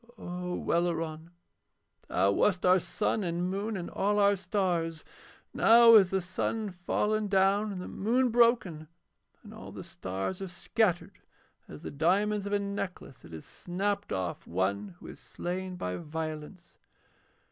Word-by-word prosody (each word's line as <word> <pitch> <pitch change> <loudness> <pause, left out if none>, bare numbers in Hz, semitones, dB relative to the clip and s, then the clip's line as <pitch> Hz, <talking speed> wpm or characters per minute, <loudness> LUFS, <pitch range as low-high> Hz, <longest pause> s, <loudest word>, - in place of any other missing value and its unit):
O 180 -1 -5
Welleran, 165 -1 -1 0.8
thou 95 +2 +2
wast 185 - +1
our 185 +1 +6
sun 210 +3 -1
and 175 +1 -2
moon 205 +2 -3
and 175 - -5
all 205 +1 0
our 200 0 +4
stars. 180 -4 -2 0.5
Now 230 0 +7
is 200 -5 +7
the 190 -1 -1
sun 210 +3 -2
fallen 210 +4 -1
down 200 +2 +2
and 190 - -5
the 180 - -6
moon 245 +5 +1
broken, 230 -10 +2 0.6
and - - -12
all - - -10
the - - -8
stars 95 - -5
are 195 - -4
scattered 180 +1 -1 0.5
as 75 - -11
the - - -6
diamonds 200 +7 +1
of 200 - -3
a - - +4
necklace 200 -8 -5
that - - -14
is 80 -1 -9
snapped 200 +3 -3
off 90 -2 -3
one 95 +2 -2
who - - -15
is - - -10
slain 185 +1 -5
by 90 - -4
violence.' 160 +2 -7
180 Hz, 150 wpm, -29 LUFS, 160-205 Hz, 0.8 s, Now